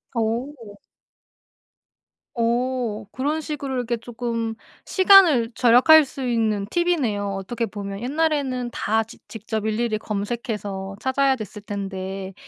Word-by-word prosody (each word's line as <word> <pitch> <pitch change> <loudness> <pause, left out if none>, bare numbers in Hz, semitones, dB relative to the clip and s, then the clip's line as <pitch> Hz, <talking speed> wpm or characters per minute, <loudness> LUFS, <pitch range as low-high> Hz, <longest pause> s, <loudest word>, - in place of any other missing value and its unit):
오. 230 -1 -3 1.6
어. 235 -2 -1
그런 295 +5 -1
식으로 285 -4 -4
이렇게 245 -1 -1
쪼끔 230 -1 -4 0.3
시간을 365 - +6
절약할 255 +6 +7
수 265 -1 -6
있는 220 -4 0
팁이네요. 265 - 0
어떻게 230 +5 -3
보면 200 -1 -6
옛날에는 275 -3 0
다 220 0 0
직 225 - -16
직접 220 -1 -4
일일이 220 0 0
검색해서 205 -2 -4
찾아야 265 0 +2
됐을 210 -2 -8
텐데 195 -1 -5
235 Hz, 250 characters per minute, -23 LUFS, 210-260 Hz, 1.6 s, 절약할